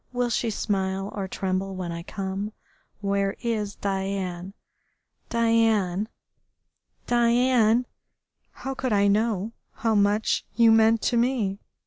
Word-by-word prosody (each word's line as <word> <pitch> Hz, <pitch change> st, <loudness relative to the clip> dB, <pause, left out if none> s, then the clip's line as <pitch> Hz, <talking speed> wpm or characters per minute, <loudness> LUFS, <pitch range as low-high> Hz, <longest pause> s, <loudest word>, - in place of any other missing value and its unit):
Will 245 Hz, -1 st, -1 dB
she 230 Hz, +1 st, 0 dB
smile 195 Hz, -2 st, -2 dB
or 195 Hz, -2 st, -3 dB
tremble 190 Hz, 0 st, -2 dB
when 180 Hz, -2 st, -4 dB
I 170 Hz, 0 st, -5 dB
come?... 195 Hz, +3 st, -4 dB, 0.5 s
Where 200 Hz, -1 st, 0 dB
is 215 Hz, -4 st, -2 dB
Diane?... 190 Hz, -1 st, -3 dB, 0.7 s
Diane, 225 Hz, -4 st, +2 dB, 1.0 s
Diane, 240 Hz, 0 st, +3 dB, 0.6 s
how 270 Hz, -, -6 dB
could 260 Hz, -3 st, -2 dB
I 200 Hz, 0 st, +3 dB
know 215 Hz, 0 st, +1 dB, 0.2 s
how 225 Hz, 0 st, 0 dB
much 205 Hz, +1 st, +2 dB
you 230 Hz, -1 st, +6 dB
meant 225 Hz, 0 st, +4 dB
to 240 Hz, -, +1 dB
me? 230 Hz, -5 st, 0 dB
210 Hz, 115 wpm, -25 LUFS, 195-230 Hz, 1.0 s, you